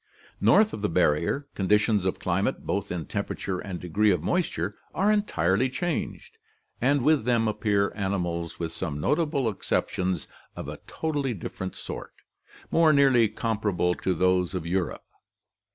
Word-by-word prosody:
North 215 0 +5
of - - -5
the 105 - 0
barrier, 85 - +1
conditions 105 0 +2
of 95 - 0
climate, 95 +3 -1
both 100 0 -2
in 85 -3 -3
temperature 95 +6 -3
and 95 -3 -5
degree 100 +5 +2
of 90 -5 +1
moisture, 100 - -1 0.2
are 200 +3 +3
entirely 125 - +2
changed, 185 - -4 0.4
and 140 -1 +3
with 150 -1 +4
them 115 -1 +2
appear 105 -2 +1
animals, 90 -4 -2
with 85 -1 -3
some 80 -3 -3
notable 150 - +1
exceptions, 95 - -1 0.3
of - - -6
a - - -6
totally 145 -6 -2
different 95 0 -6
sort, - - -7 0.6
more 165 -1 +5
nearly 135 -6 +5
comparable 105 -5 0
to 95 0 -1
those 90 +1 +2
of 90 -3 -3
Europe. 90 0 -2
100 Hz, 145 wpm, -26 LUFS, 90-135 Hz, 0.6 s, North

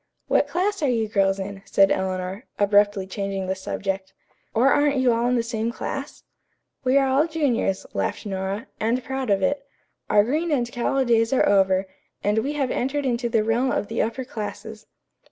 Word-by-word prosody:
"What 290 - +3
class 370 +6 -1
are 290 - +2
you 225 -3 +1
girls 195 -2 +2
in?" 195 0 -6
said 195 0 +4
Eleanor, 190 +3 -2
abruptly 205 -1 +3
changing 195 0 -3
the 190 - -1
subject. 190 0 -4 0.4
"Or 245 +5 +3
aren't 290 0 +3
you 260 -2 +3
all 235 +1 +1
in 250 - +2
the 235 - +1
same 230 0 -2
class?" 275 +4 -6 0.6
"We 260 +1 +3
are 270 -1 +4
all 275 +4 +3
juniors," 270 - 0
laughed 95 - -2
Nora, 195 +1 -3
"and 235 +3 0
proud 265 -1 -3
of 195 -1 +2
it. 280 +7 +1 0.5
Our 205 - +5
green 310 +9 -1
and 245 -6 0
callow 260 +2 0
days 230 -1 +3
are 265 - +3
over, 190 -1 +3 0.4
and 210 +2 +2
we 275 +6 -2
have 275 -4 -1
entered 275 +3 -1
into 240 -1 0
the 225 -2 +2
realm 235 +4 +1
of 205 - -1
the 225 - 0
upper 240 +4 -2
classes." 220 -1 -7
230 Hz, 190 wpm, -24 LUFS, 195-265 Hz, 0.6 s, Our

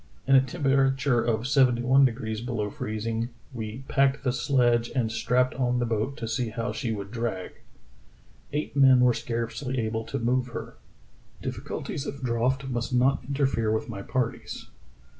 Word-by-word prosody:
In 135 - +3
a 130 - +8
temperature 135 -3 +2
of 115 +1 0
seventy 130 -4 +3
one 135 +2 +6
degrees 110 -3 -2
below 115 -4 -2
freezing 110 +3 -3 0.2
"we 110 +2 -6
packed 135 -1 +2
the 125 -2 +1
sledge 120 -2 +2
and 115 -4 +1
strapped 125 +2 +1
on 125 -1 0
the 120 - +1
boat 115 +4 -1
to 115 - -4
see 110 +1 -1
how 115 +2 -3
she 120 -5 -3
would 100 -2 -5
drag. 115 -6 -4 0.9
Eight 150 -1 -3
men 130 -3 +6
were 125 -1 +5
scarcely 120 +3 -3
able 110 0 -1
to - - -3
move 125 +2 +1
her.... 115 - -7 0.7
Difficulties 145 - -4
of 140 -1 -6
draught 125 +3 0
must 120 -2 -2
not 130 +2 +3
interfere 135 -4 0
with 110 +2 -1
my 100 -4 -5
parties. 120 +3 -3
125 Hz, 160 wpm, -27 LUFS, 115-135 Hz, 0.9 s, a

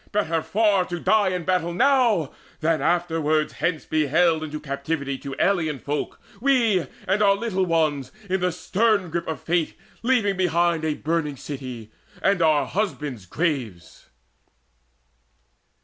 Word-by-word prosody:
Better 170 -6 0
far 205 0 +2
To 175 -1 -5
die 210 +3 +3
in 180 -2 -2
battle 175 -1 0
now, 240 - +3 0.3
than 160 -2 +1
afterwards 160 -2 +1
Hence 165 -4 -1
to - - -27
be 155 -1 +2
haled 160 +2 +3
into 155 -1 -5
captivity 140 0 -3
To 135 -1 -6
alien 160 -7 +1
folk, 145 +3 -4 0.2
we 230 -8 +2 0.2
and 195 +3 +2
our 200 -1 +5
little 195 -3 -1
ones, 155 -6 0 0.2
In 190 0 0
the 180 0 +1
stern 200 +1 +1
grip 170 +1 -3
of 160 - -4
fate 170 -1 0 0.3
leaving 230 -6 +2
behind 170 -2 +1
A 155 -1 0
burning 150 -2 -2
city, 125 -6 -7 0.3
and 195 -3 +3
our 155 -3 +3
husbands' 150 - -3
graves." 125 - -3
165 Hz, 145 wpm, -24 LUFS, 150-190 Hz, 0.3 s, our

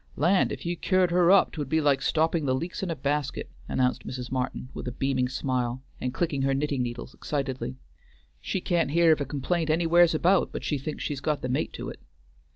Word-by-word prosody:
"Land, 175 +7 +3
if - - -6
you 175 +1 -1
cured 185 0 +2
her 175 0 +4
up 195 +1 +6
'twould 145 -4 -5
be 160 +1 +2
like 145 -3 +2
stopping 160 -1 +1
the 130 - +2
leaks 170 +7 -4
in 190 - -2
a 165 - -1
basket," 145 -1 -2 0.2
announced 125 -1 0
Mrs. 125 -1 -6
Martin 130 -1 -3
with - - -6
a - - -2
beaming 130 0 0
smile, 130 -1 -2 0.2
and 125 - -2
clicking 145 0 -1
her 135 0 +2
knitting 140 -1 0
needles 120 +1 -5
excitedly. 130 - -3 0.6
"She 190 - -3
can't 175 -5 +1
hear 165 +2 +5
of 155 - +3
a - - 0
complaint 155 +4 -1
anywheres 170 +1 +4
about 180 +4 +3
but - - -5
she 145 - -1
thinks 150 +3 -5
she's 140 -2 -3
got 150 -1 -1
the 125 - -2
mate 125 - -1
to - - -5
it." - - -9
145 Hz, 215 wpm, -27 LUFS, 130-170 Hz, 0.6 s, up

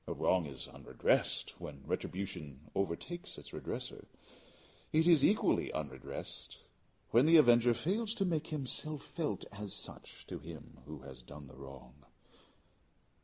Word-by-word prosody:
A - - -1
wrong 90 -4 +3
is 65 -3 -6
unredressed - - +1
when 70 -3 -8
retribution 80 -7 -4
overtakes 100 - -2
its - - -10
redresser. - - -5 0.8
It 160 +1 +4
is 165 -5 +7
equally 210 - +4
unredressed 70 -5 -5 0.5
when 120 +6 +6
the 165 +1 +9
avenger 120 -4 +7
fails 210 - 0
to 195 - +1
make 165 -3 0
himself 150 +1 -2
felt 165 -3 -2
as 100 0 -4
such - - -8
to - - -6
him 80 -3 -10
who 75 -2 -7
has 65 -1 -10
done 70 +4 -10
the 65 -1 -13
wrong. 65 -2 -10
100 Hz, 135 wpm, -35 LUFS, -, 0.8 s, the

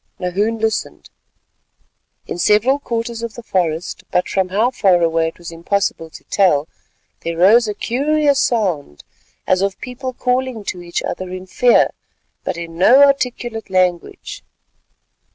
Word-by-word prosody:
Nahoon 200 +5 -1
listened. 220 -1 -3 1.1
In - - -6
several 215 +9 +3
quarters 230 -3 -4
of 235 -1 -5
the 240 - -9
forest, 170 -5 -2
but 180 - 0
from 190 -1 0
how 215 +7 +1
far 190 -8 +3
away 165 -1 +1
it 165 - -7
was 170 -1 -9
impossible 170 0 -2
to - - -13
tell, 160 -7 +2 0.5
there 165 0 -4
rose 215 +7 +5
a 210 - -3
curious 285 +5 +1
sound, 185 - -1 0.4
as 185 0 +2
of 195 0 -1
people 255 +1 -6
calling 250 -2 -1
to 180 -2 -5
each 170 0 -4
other 185 +1 -4
in 185 0 -7
fear 245 +6 +3 0.5
but - - -3
in 165 0 -7
no 255 +9 +7
articulate 245 -5 0
language. 180 -2 -1
200 Hz, 145 wpm, -18 LUFS, 175-240 Hz, 1.1 s, no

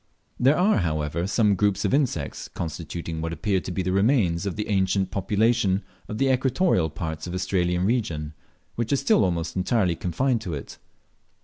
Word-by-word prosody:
There 135 +5 +4
are, 190 +5 +3
however, 80 0 -1
some 105 0 +3
groups 100 0 +1
of - - +1
insects, 125 - -1
constituting 80 0 -5
what 80 0 -3
appear 95 +4 0
to 90 - -6
be 95 +1 -2
the 90 - -1
remains 100 -4 +2
of 95 - -3
the 105 - -3
ancient 95 -1 +1
population 105 0 +1 0.2
of 105 - -5
the 135 +2 +3
equatorial 130 - +2
parts 80 +1 -5
of 90 - -5
the - - -3
Australian 90 -1 0
region, 85 -10 -1 0.4
which 115 -1 -3
are - - +4
still 140 -5 +3
almost 85 -3 -1
entirely 95 -1 +1
confined 115 +9 0
to 90 -7 -4
it. 70 - -9
95 Hz, 180 wpm, -25 LUFS, 85-115 Hz, 0.4 s, There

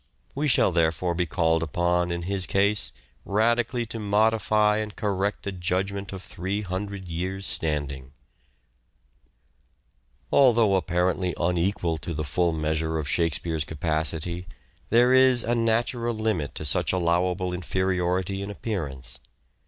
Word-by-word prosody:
We 150 +2 -1
shall 125 - +4
therefore 85 +1 +1
be 90 0 -1
called 80 -1 +1
upon 85 +2 0
in 85 0 -3
his 95 0 -1
case 100 +2 +3 0.3
radically 120 +3 +1
to 115 0 -6
modify 105 0 +2
and 105 -1 -4
correct 100 -1 -2
a 100 - -2
judgment 95 +2 -2
of 95 -1 -7
three 95 +4 -3
hundred 95 0 -5
years' 95 +3 -3
standing. 75 -4 -2
An 65 - -21 2.1
English - - -35
Although 115 -6 +5
apparently 90 0 0
unequal 85 -1 0
to 80 +2 -5
the 75 - -2
full 85 +4 +1
measure 80 0 -1
literary 80 -1 -2
°f - - -7
Shakespeare's 80 -1 0
capacity, 80 +3 -2 0.4
there 120 +3 +5
is 130 -2 +5
a 120 - 0
natural 115 +1 0
limit 110 -10 -2
to - - -5
tastes 75 - +4
such - - +1
allowable 90 +1 0
inferiority 95 +1 -1
in 100 - -5
appearance. 70 - -5
90 Hz, 140 wpm, -25 LUFS, 85-105 Hz, 2.1 s, Although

